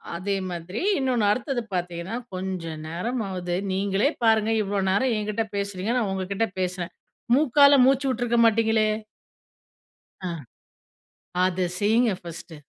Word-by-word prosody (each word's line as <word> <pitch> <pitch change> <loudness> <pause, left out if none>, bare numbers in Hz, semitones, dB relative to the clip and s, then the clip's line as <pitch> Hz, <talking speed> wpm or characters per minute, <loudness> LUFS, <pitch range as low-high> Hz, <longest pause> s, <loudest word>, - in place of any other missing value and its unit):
அதே 195 +3 -2 0.2
மாதிரி 175 +4 -5 0.2
இன்னொன்னு 250 -5 +1
அடுத்தது 255 +2 -1
பார்த்தீங்கன்னா. 175 +3 -3 0.2
கொஞ்சம் 180 -4 -4
நேரம் 225 +9 -3
ஆவது 180 -2 -3 0.2
நீங்களே 195 +6 +1
பாருங்க 220 -1 +3
இவ்வளோ 200 0 -1
நேரம் 245 +6 +2
என்கிட்டே 215 +1 -1
பேசுகிறீங்க, 200 +1 -2
நான் 220 -5 0
உங்ககிட்ட 195 +3 -1
பேசுறேன் 180 -1 -2 0.4
மூக்கால 285 0 +6
மூச்சு 270 +1 +3
விட்டுருக்க 245 -2 0
மாட்டீங்களே? 220 -1 +3 1.4
அ. - - -2 1.1
அத 185 -1 +1
செய்யுங்க 220 +2 +3
பஸ்ட்டு. 165 -1 -8
205 Hz, 120 wpm, -25 LUFS, 185-230 Hz, 1.4 s, மூக்கால